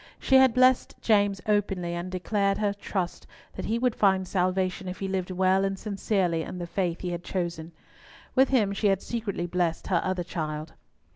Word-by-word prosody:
She 265 - +4
had 265 -3 +5
blessed 255 0 +4
James 205 -3 +2
openly, 195 -4 0
and 175 +1 -4
declared 195 +2 0
her 205 -1 0
trust 190 -3 -4 0.3
that - - -6
he 225 - 0
would 250 0 +1
find 190 -3 +2
salvation 185 0 0
if 180 - -5
he 195 - -3
lived 190 -1 -2
well 185 +1 +2
and 195 0 -1
sincerely 195 -5 0
in 180 - -6
the 175 - -4
faith 175 -1 -2
he 180 - -3
had 175 0 -4
chosen. 170 -3 -3 0.6
With 265 0 +4
him 215 -7 +2
she 205 +1 +1
had 195 -1 +1
secretly 215 -7 -3
blessed 175 -2 -1
her 180 -3 +2
other 185 -1 -1
child. 155 -3 -5
190 Hz, 190 wpm, -27 LUFS, 175-205 Hz, 0.6 s, had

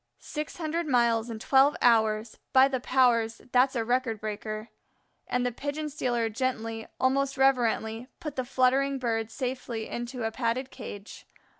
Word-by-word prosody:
"Six 300 0 -6
hundred 330 0 -2
miles 235 -3 +2
in 225 - -5
twelve 270 +5 +4
hours! 220 -2 +2
By 265 0 +7
the 265 -2 -2
powers, 240 -3 +2
that's 260 +2 +4
a 230 -2 0
record 245 -2 0
breaker." 215 +1 -5 0.6
And 250 0 0
the 245 - 0
pigeon 290 +5 -4
stealer 245 -5 -1
gently, 225 -1 -3
almost 275 +1 +1
reverently, 240 -3 +1
put 300 -3 -6
the 255 - -1
fluttering 265 +2 +2
Bird 225 -3 -1
safely 245 -2 -4
into 240 +1 -5
a 225 - -1
padded 250 +2 -2
cage. 205 +1 -9
245 Hz, 150 wpm, -28 LUFS, 225-265 Hz, 0.6 s, By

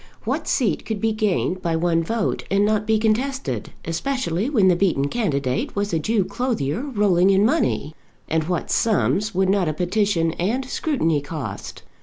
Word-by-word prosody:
What - - -2
seat 240 -8 +1
could 220 -2 -4
be 225 +2 +1
gained 205 -4 0
by 165 -2 0
one 165 0 +1
vote 225 +4 -1
and 200 +1 +3
not 215 0 0
be 220 0 +3
contested, 220 - -1
especially 210 - -1
when 215 -10 +3
the 180 - +5
beaten 170 -7 +1
candidate 140 - -1
was 200 -1 -1
a 165 - +2
Jew 215 +3 +1
clothier 200 - -2
rolling 205 -9 +2
in 195 +1 +4
money? 230 - 0 0.3
And 160 -1 0
what 175 -1 -2
sums 210 -2 +1
would 190 0 +2
not 190 -3 +2
a - - -1
petition 180 -1 +1
and 230 +9 0
scrutiny 245 - 0
cost? 150 -1 -7
195 Hz, 170 wpm, -22 LUFS, 165-220 Hz, 0.3 s, the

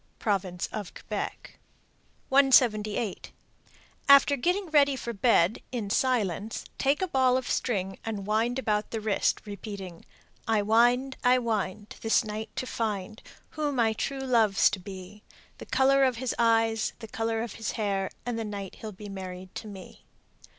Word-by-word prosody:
Province 190 -4 -1
of 210 -4 -6
Quebec. - - -6 0.7
178. 235 -6 +3 0.8
After 280 0 +7
getting 360 +9 0
ready 285 -2 +4
for 235 -2 -5
bed 215 -3 +3
in 220 -5 -3
silence, 220 -5 0
take 285 +6 +2
a - - 0
ball 260 -5 +3
of 260 - -4
string 195 -5 -1
and 210 -3 -4
wind 225 +4 +1
about 210 -5 -1
the 225 - -3
wrist, 215 -2 0
repeating, 200 -3 -8 0.4
I 220 -2 +2
wind, 245 +5 +3
I 250 0 +5
wind, 215 -4 -3
This 225 - +3
night 215 +1 -5
to - - -3
find, 215 -3 -3 0.3
Who 300 -2 -2
my 230 -5 +2
true 270 +4 -3
love's 230 -6 +3
to 195 - -3
be; 190 +2 -10 0.4
The - - -9
color 275 +1 +4
of 260 -2 +3
his 250 +1 -2
eyes, 225 -1 +2
The 225 - -9
color 225 +1 -2
of 235 - -6
his 225 -1 -4
hair, 200 -3 -1 0.2
And 240 -2 -2
the - - -2
night 200 -3 -6
he'll 220 - -6
be 205 +1 -10
married 185 -1 -8
to 220 - -7
me. 195 -3 -11
225 Hz, 155 wpm, -28 LUFS, 200-250 Hz, 0.8 s, After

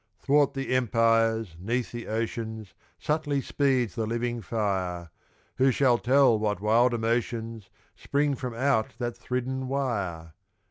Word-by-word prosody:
'Thwart 140 +4 +2
the 135 -1 -2
empires, 115 -4 +2
'neath 120 +6 -2
the 120 -1 -7
oceans, 110 -1 -4 0.2
Subtly 150 -2 -1
speeds 130 -5 0
the 115 -2 -2
living 120 +1 -2
fire; 95 -5 -2 0.5
Who 135 +1 +4
shall 125 -2 +3
tell 130 -3 +4
what 105 -3 -1
wild 115 +4 +3
emotions 115 -2 -2 0.3
Spring 145 0 0
from 125 -3 -5
out 125 -3 +1
that 120 -1 -3
thridden 130 +1 -3
wire? 100 - -3
115 Hz, 130 wpm, -27 LUFS, 110-130 Hz, 0.5 s, Who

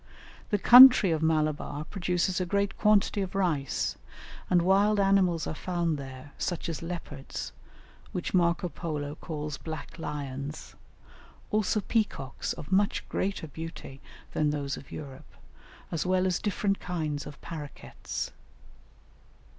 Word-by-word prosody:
The 210 - +2
country 245 -2 +9
of 160 -1 0
Malabar 155 -2 0
produces 180 +1 -1
a - - 0
great 200 +1 0
quantity 210 -1 +3
of 190 0 -4
rice, 160 -8 0 0.5
and 175 -1 +4
wild 200 +3 +4
animals 190 -5 +3
are - - -3
found 170 -2 -1
there, 135 +1 -9
such 175 -2 -2
as 165 - -4
leopards, 165 -5 -6 0.6
which 180 - -4
Marco 175 -1 +2
Polo 150 -4 -4
calls 150 -2 -5
"black 160 +1 -7
lions," 145 -1 -5 0.8
also 210 0 +1
peacocks 200 - -1
of 150 - -10
much 200 +2 +2
greater 195 -3 -2
beauty 160 -3 -8 0.3
than 150 -1 +2
those 145 -2 -2
of - - -12
Europe, 135 -3 -9 0.6
as 165 - -1
well 185 0 +2
as 185 -2 +1
different 200 -1 0
kinds 155 -5 -3
of 145 - -10
parroquets. 155 -4 -6
170 Hz, 130 wpm, -28 LUFS, 150-190 Hz, 0.8 s, country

